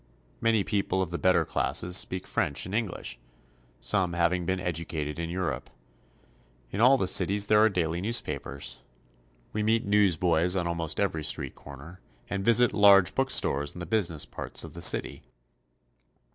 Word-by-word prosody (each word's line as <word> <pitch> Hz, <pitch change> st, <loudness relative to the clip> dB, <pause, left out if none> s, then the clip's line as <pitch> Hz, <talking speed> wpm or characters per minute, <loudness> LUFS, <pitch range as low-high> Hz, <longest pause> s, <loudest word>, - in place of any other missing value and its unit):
Many 115 Hz, -3 st, +2 dB
people 100 Hz, -2 st, -1 dB
of 85 Hz, -, -7 dB
the 85 Hz, -, -4 dB
better 95 Hz, 0 st, +2 dB
classes 90 Hz, +1 st, -1 dB
speak 95 Hz, -1 st, 0 dB
French 70 Hz, -, -1 dB
and 95 Hz, -, -8 dB
English, 95 Hz, -, -4 dB, 0.6 s
some 95 Hz, -4 st, 0 dB
having 85 Hz, 0 st, 0 dB
been 95 Hz, 0 st, -1 dB
educated 80 Hz, -4 st, -4 dB
in 85 Hz, 0 st, -4 dB
Europe. 85 Hz, -8 st, -4 dB, 1.0 s
In 100 Hz, -, -3 dB
all 130 Hz, +3 st, +6 dB
the 95 Hz, -, -1 dB
cities 100 Hz, +2 st, +2 dB
there 105 Hz, 0 st, +4 dB
are 110 Hz, -, +5 dB
daily 85 Hz, -3 st, -2 dB
newspapers. 70 Hz, -, -2 dB, 0.7 s
We 105 Hz, -, -2 dB
meet 110 Hz, +2 st, +1 dB
newsboys 90 Hz, -4 st, +2 dB
on 90 Hz, -2 st, -1 dB
almost 85 Hz, -2 st, -3 dB
every 80 Hz, -6 st, -1 dB
street -, -, -2 dB
corner, 70 Hz, +6 st, -13 dB, 0.3 s
and 100 Hz, 0 st, -2 dB
visit 115 Hz, +2 st, +4 dB
large 100 Hz, -3 st, +5 dB
bookstores 75 Hz, -, 0 dB
in -, -, -10 dB
the 85 Hz, -, -5 dB
business 85 Hz, -5 st, -1 dB
parts -, -, -4 dB
of -, -, -10 dB
the 85 Hz, -, -9 dB
city. -, -, +3 dB
90 Hz, 160 wpm, -27 LUFS, 85-105 Hz, 1.0 s, all